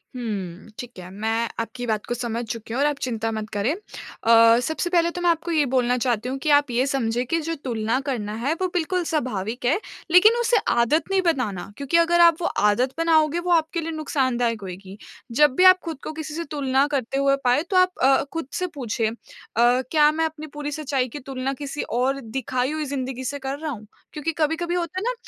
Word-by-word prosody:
हुँ, 200 -6 -5
ठीक 245 -6 -8
है। 180 0 -9
मैं 225 +3 -1
आपकी 230 +2 -4
बात 215 -2 -1
को - - -1
समझ 235 -1 -3
चुकी 225 -1 -7
हूँ 250 - -1
और 290 - +4
आप 295 -1 -1
चिंता 225 -2 -2
मत 215 -1 -4
करें। 210 +7 0
अ, 230 - +3
सबसे 320 +2 -2
पहले 340 -1 +3
तो 355 - -6
मैं 350 - +3
आपको 335 +1 0
ये 305 -3 +3
बोलना 250 -1 +2
चाहती 240 -1 -1
हूँ 265 - -3
कि 310 - 0
आप 285 -1 -1
ये 245 +2 +2
समझें 245 -3 -1
कि 330 +7 0
जो 330 - -1
तुलना 235 -4 -2
करना 210 -5 -3
है 285 +4 +1
वो 370 - +2
बिल्कुल 360 +1 0
स्वाभाविक 245 -6 -2
है 295 +10 +2 0.3
लेकिन 425 +6 +7
उसे 475 0 +3
आदत 235 +7 +2
नहीं 385 -1 +3
बनाना, 250 - -1
क्योंकि 280 +4 +1
अगर 340 +1 +3
आप 335 -1 +7
वो - - -1
आदत 210 +6 +1
बनाओगे 325 -1 +3
वो 350 +1 -2
आपके 330 0 +2
लिए 330 +1 -4
नुकसानदायक 255 -7 -1
होएगी। 190 +1 -9 0.3
जब 290 +2 +4
भी 365 - +4
आप 370 0 +8
ख़ुद 330 -3 -4
को - - -4
किसी 310 -1 -6
से 335 +2 -3
तुलना 270 -2 +2
करते 270 -3 -2
हुए 275 0 +3
पाए 250 +4 +3
तो 375 - +2
आप 365 0 +5
अ, 270 +1 +5
ख़ुद 330 -5 -4
से 365 - -1
पूछिए 230 -4 -1
अ, - - -7 0.4
क्या 255 +6 +4
मैं 320 +1 0
अपनी 310 -1 -6
पूरी 295 0 -4
सच्चाई 280 -4 -1
की 290 - -7
तुलना 265 0 -4
किसी 285 +1 -4 0.2
और 270 +2 +1
दिखाई 255 +2 -2
हुई 310 0 -2
ज़िंदगी 260 -2 -4
से 285 +2 -3
कर 270 +1 -4
रहा 310 -1 -3
हूँ। 215 -5 -8 0.3
क्योंकि 300 +2 -2
कभी-कभी 325 +3 0
होता 355 +1 -2
है - - -5
ना, - - 0
270 Hz, 220 wpm, -23 LUFS, 235-320 Hz, 0.4 s, आप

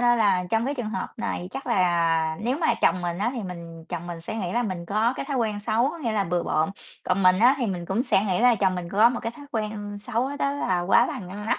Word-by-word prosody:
nên 240 -1 +4
là 200 -4 +3
trong 225 +1 +2
cái 280 +3 -1
trường 240 -6 -4
hợp 235 - -3
này 220 -6 -3
chắc 270 - -7
là 165 -3 +2
nếu 245 +6 -1
mà 320 -2 +2
chồng 185 - +3
mình 175 0 -2
á 215 +4 +1
thì 240 - -4
mình 170 -3 -8
chồng 175 -1 -5
mình 170 -1 -6
sẽ 195 +7 -5
nghĩ 185 -5 -3
là 240 - +1
mình 185 -6 -4
có 215 +5 +1
cái - - -4
thói 275 - -2
quen 215 -4 -1
xấu, 230 +5 +1
có 335 - -8
nghĩa 240 -8 -2
là 205 -2 +1
bừa 175 -1 0
bộn, 155 +2 0 0.3
còn 185 +2 +1
mình 185 0 +5
á 245 +5 +6
thì 245 - 0
mình 180 -4 -3
cũng 195 +7 0
sẽ 205 -6 +2
nghĩ 185 -3 0
là 245 0 +6
chồng 190 -3 +1
mình 180 -1 -5
có 210 +5 +5
một 240 -1 -3
cái 230 - -3
thói 290 -1 -11
quen 210 -2 -4
xấu 245 +7 -2
đó 280 -1 0
là 185 -11 0
quá 175 +2 +4
là - - -4
ngăn 200 +3 -7
nắp, - - +1
205 Hz, 285 wpm, -25 LUFS, 180-235 Hz, 0.3 s, á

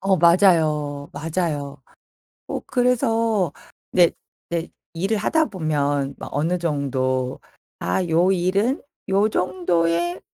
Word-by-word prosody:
어 195 0 +2
맞아요, 155 -5 +3
맞아요. 150 -2 -3 0.6
어 - - -3
그래서 230 - +1 0.4
네 175 -2 +5 0.4
네, 170 -1 -1
이제 - - -12 0.3
일을 195 +6 0
하다 315 +9 +2
보면 145 -7 -1
뭐 - - -7
어느 160 +5 0
정도 130 -5 -1 0.4
'아 90 - 0
요 175 +4 +3
일은 195 - +1 0.3
요 200 +3 +3
정도에 175 -2 0
170 Hz, 195 characters per minute, -22 LUFS, 145-195 Hz, 0.6 s, 네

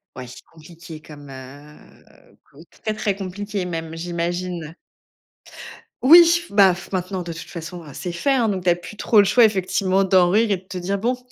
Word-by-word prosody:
Ouais, 130 - -8 0.3
compliqué 160 0 -13
comme, 145 -2 -13
heu, 140 +3 -15 0.2
co 140 - -19 0.2
très 215 - -1
très 205 -2 -1
compliqué 200 0 -5
même, 165 -2 -5
j'imagine? 175 -1 -4 1.3
Oui, 335 +4 +7
b 200 0 -2
af 185 -1 +3
maintenant, 185 0 -3
de 170 -1 -6
toute 165 - -10
façon, 170 0 -8
c'est 175 -1 -6
fait, 275 +11 -1
hein. 240 -4 +1
Donc, 190 -4 -2
tu 180 - +2
as 175 - +4
plus 175 +4 -11
trop 215 - 0
le 200 - +6
choix 240 +4 +4
effectivement 190 -1 +1
d'en 185 -2 +4
rire 220 +3 +2
et 200 - +2
de 180 - -10
te 185 0 -8
dire 195 +3 -2
bon: 245 +5 -1
180 Hz, 185 wpm, -21 LUFS, 165-200 Hz, 1.3 s, Oui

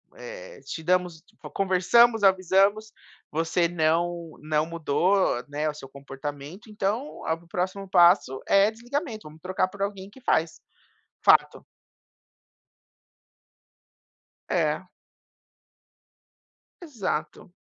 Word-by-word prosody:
eh, - - -10
te 160 - -7
damos 180 -1 0 0.3
conversamos, 200 +4 +3
avisamos 195 +3 +3 0.4
você 165 +2 0
não 170 0 0
não 155 0 0
mudou, 165 -2 +1
né, 150 +2 -2
o - - -4
seu 135 -3 -11
comportamento 140 - -8
então, 210 +5 -2 0.2
o 165 +1 -3
próximo 185 +2 -3
passo 175 -7 +4
é 200 +2 +4
desligamento 240 - -5
vamos 155 +1 -15
trocar 185 +1 0
por 195 +1 -11
alguém 200 -1 -4
que 260 +5 -17
faz. 160 -8 +1 0.7
Fato. - - +4 2.9
É. - - 0 2.0
Exato, 195 - -4
180 Hz, 95 wpm, -25 LUFS, 160-205 Hz, 2.9 s, passo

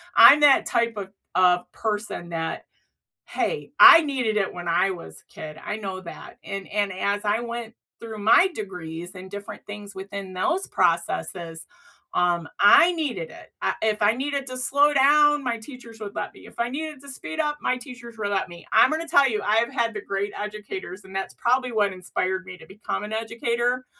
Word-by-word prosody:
I'm 290 - +9
that 290 -2 +6
type 235 -1 0
of 195 -2 -5 0.3
of 180 -1 +3
person 210 -5 -4
that, 165 -1 -4 0.6
"Hey, 480 - -3
I 330 - +11
needed 255 -8 -1
it 195 -2 0
when 175 -1 -7
I 170 +3 +2
was 175 -3 -10
kid," 155 0 -9
I 210 - -3
know 190 -3 -5
that. 170 -2 -11
And 195 -1 -6
and 205 -2 -1
as 200 +2 -1
I 210 +3 +1
went 235 -1 -6 0.2
through 225 -1 -8
my 230 - +5
degrees 175 - -7
and 185 0 -10
different 205 0 -8
things 205 -1 -8
within 195 0 -7
those 340 - 0
processes, 165 -2 -1 0.5
um, 175 -2 +1
I 270 - +7
needed 245 - -3
it. - - -14
I - - 0
if 215 -1 0
I 205 +1 +4
needed 275 +2 -3
to 255 0 -5
slow 285 +4 +3
down, 295 +1 +5
my 240 -2 -1
teachers 230 -2 -12
would 205 -1 -7
let - - -4
me, - - -15
if - - -16
I 235 +1 0
needed 300 +1 -5
to 280 - -11
speed 315 +4 -7
up, 295 -1 0
my 255 - 0
teachers 245 -2 -11
re 205 -2 -2
let 195 -2 -1
me. 170 -1 -12
I'm 255 - +6
gonna 320 +2 -2
tell 280 -3 +5
you, 215 -3 -2
I've 225 +3 +2
had 230 -1 0
the 210 - -5
great 200 0 -3
educators 210 - -6
and 190 0 -12
that's 195 0 -3
probably 255 +1 +1
what 205 -3 +1
inspired 185 0 -3
me 185 0 -9
to - - -14
become 210 +1 -5
an 210 +1 -6
educator. 235 +3 -1
215 Hz, 195 wpm, -24 LUFS, 190-255 Hz, 0.6 s, I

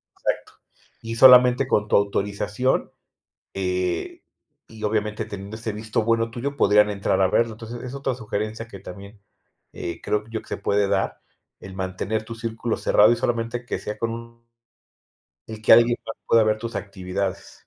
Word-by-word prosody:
Exacto - - -3 0.5
Y 115 0 -5
solamente 125 +1 +7
con 105 -4 +1
tu - - +2
autorización, 100 +4 0 0.6
eh, 90 -2 -2 0.5
y 110 -1 -12
obviamente 105 0 -1
teniendo 100 0 -7
ese 110 -1 -4
visto 110 +1 -2
bueno 115 0 +1
tuyo 135 +4 -4
podrían 105 -3 +5
entrar 100 -1 0
a 95 - +5
verlo. 115 +3 +1
Entonces 115 +2 -8
es 125 +1 -6
otra 135 -2 -2
sugerencia 110 0 -4
que 100 -4 -11
también, 100 +3 -11 0.5
eh, 85 - -6
creo 105 0 -1
yo 115 -1 -4
que - - -21
se - - -3
puede 100 0 +1
dar, 100 -1 -1 0.4
el 95 - -9
mantener 95 +3 -3
tu 115 +1 -7
círculo 115 0 -3
cerrado 105 +2 +5
y 120 - +4
solamente 120 +1 -2
que - - -3
sea 105 0 -6
con 115 +1 -2
un 115 0 -10 1.0
y 110 -1 -8
que 110 - +7
alguien 120 +1 +6
más 110 - -6
pueda 115 -1 +5
ver 110 0 +1
tus 115 0 -6
actividades. 95 -1 -4
110 Hz, 170 wpm, -23 LUFS, 100-115 Hz, 1.0 s, solamente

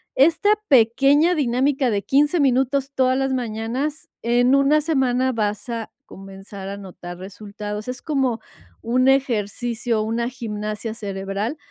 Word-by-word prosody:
Esta 325 +9 +3 0.2
pequeña 275 +7 +4
dinámica 265 0 +1
de 200 -1 0
15 295 +5 +2
minutos 270 0 +1
todas 260 0 +2
las 270 0 0
mañanas, 245 +5 -3
en 245 +3 +3
1 275 +2 +4
semana 260 -4 +1
vas 210 -1 -2
a 230 -2 -4
comenzar 195 0 -9
a 200 - -5
notar 180 -2 -9
resultados. 210 +3 -7
Es 250 0 -5
como 265 -6 0 0.4
un 255 +3 +2
ejercicio, 235 -2 0
una 230 +2 -1
gimnasia 215 -3 -5
cerebral 200 +4 -4
240 Hz, 130 wpm, -22 LUFS, 210-270 Hz, 0.4 s, pequeña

